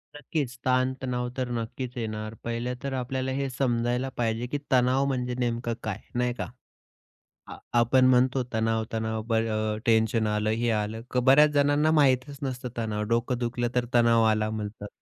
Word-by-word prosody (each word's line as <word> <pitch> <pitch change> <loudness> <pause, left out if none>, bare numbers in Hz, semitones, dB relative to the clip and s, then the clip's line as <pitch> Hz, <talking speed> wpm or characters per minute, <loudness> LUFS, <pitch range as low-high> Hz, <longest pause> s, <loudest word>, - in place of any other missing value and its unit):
नक्कीच 145 -4 -3
ताण-तणाव 130 -1 0
तर 125 -1 -1
नक्कीच 120 +2 -4
येणार. 110 -1 -4
पहिलं 120 +2 -2
तर 140 -1 -3
आपल्याला 130 +1 -2
हे 135 +1 -1
समजायला 125 0 0
पाहिजे, 115 +1 -1
की 145 - -2
तणाव 130 +1 +3
म्हणजे 125 -2 -1
नेमकं 120 -1 -1
काय? 110 -1 -3 0.2
नाही 125 0 +1
का? - - -4 1.0
अ, - - -8 0.2
आपण 130 +2 +4
म्हणतो 130 0 +3
तणाव 110 0 +1
तणाव, 110 0 -2
बरं 110 -1 0
अ, - - -6
टेन्शन 110 -1 +3
आलं, 105 0 0
हे 115 +2 0
आलं. 110 +1 -2 0.2
बऱ्याच 150 +3 +7
जणांना 145 +2 +3
माहीतच 140 -2 +2
नसतं, 125 -2 -4
तणाव 110 -2 -2
डोकं 120 +2 +1
दुखलं 120 0 -1
तर 125 - +2
तणाव 115 -1 +5
आला 110 -1 +2
म्हणतात. 105 -1 -5
120 Hz, 160 wpm, -27 LUFS, 110-130 Hz, 1.0 s, बऱ्याच